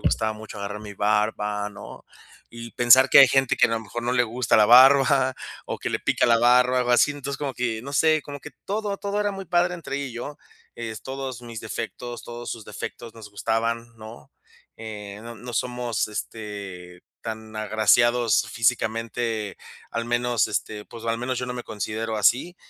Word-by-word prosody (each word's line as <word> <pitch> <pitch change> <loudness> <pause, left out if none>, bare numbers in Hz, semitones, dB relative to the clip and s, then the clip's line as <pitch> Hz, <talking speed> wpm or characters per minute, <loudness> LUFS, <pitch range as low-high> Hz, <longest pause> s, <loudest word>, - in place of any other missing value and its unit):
gustaba 110 -1 0
mucho 110 -1 -10
agarrar 100 +1 -5
mi 105 -1 -9
barba, 105 0 0
¿no? 105 0 -11 0.5
Y 115 0 -9
pensar 130 +2 +6
que - - +8
hay 135 - +9
gente 135 0 +2
que - - +5
a - - -6
lo 115 - 0
mejor 120 +2 -6
no 120 - 0
le 125 -1 +3
gusta 120 +1 +1
la 105 -1 +6
barba 130 +1 +6 0.3
o - - -4
que - - -3
le - - -2
pica - - +1
la 115 -1 +5
barba, 125 +2 +4
algo 125 0 0
así. 145 +4 +4
Entonces 140 -1 -6
como 140 -3 -3
que, 120 -3 -2
no 140 +2 -8
sé, 155 0 +3
como 145 -1 -8
que - - -10 0.2
todo, 205 0 -2
todo 200 +1 -2
era 205 0 0
muy 195 0 -7
padre 175 +1 +2
entre 155 -5 -5
ella 140 -1 -3
y - - -10
yo, 125 +5 -6 0.4
eh, 115 -1 -5
s 110 - -8
todos 130 -2 -6
mis 115 -2 -8
defectos, 115 +3 -6
todos 120 0 -7
sus 115 -3 -6
defectos, 115 +2 -8
nos 110 -2 -11
gustaban, 115 +3 -1
¿no?, 110 -10 -12 0.4
eh, 105 -2 -8
no 115 0 -8
no 120 +3 -9
somos 120 -2 -2
este, 100 -5 -7 0.2
tan 110 -1 -7
agraciados 115 +2 +3
físicamente, 115 -2 -1 0.3
al 115 0 -3
menos, 120 -2 +1
este, 105 -1 -3
pues, 115 -1 -11
al 115 0 -1
menos 125 +1 -2
yo 125 - -3
no 125 - -4
me 120 - -5
considero 110 +1 -4
así, 130 - +2
115 Hz, 195 wpm, -24 LUFS, 110-125 Hz, 0.5 s, hay